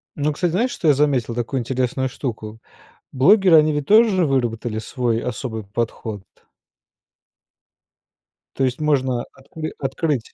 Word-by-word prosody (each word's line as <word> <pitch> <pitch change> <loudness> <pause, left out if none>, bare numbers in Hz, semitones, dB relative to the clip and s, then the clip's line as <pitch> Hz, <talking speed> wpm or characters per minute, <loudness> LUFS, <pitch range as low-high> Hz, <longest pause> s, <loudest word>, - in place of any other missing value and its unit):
Но, 150 +1 -1
кстати, 175 +2 -1
знаешь, 235 +9 0
что 165 - -3
я 145 - +6
заметил, 135 -5 0
такую 120 +2 -2
интересную 130 +1 -1
штуку: 110 -4 -6 0.5
блогеры, 180 +6 +5
они 155 0 +4
ведь 145 -1 -3
тоже 210 -5 +4
выработали 120 -4 -1
свой 115 +1 -2
особый 110 -2 -5
подход. 110 -1 -4 2.3
То 135 - -1
есть 125 -1 0
можно 130 -5 +1
откры 155 +4 -8
открыть. 135 -2 -2
130 Hz, 130 wpm, -21 LUFS, 120-150 Hz, 2.3 s, я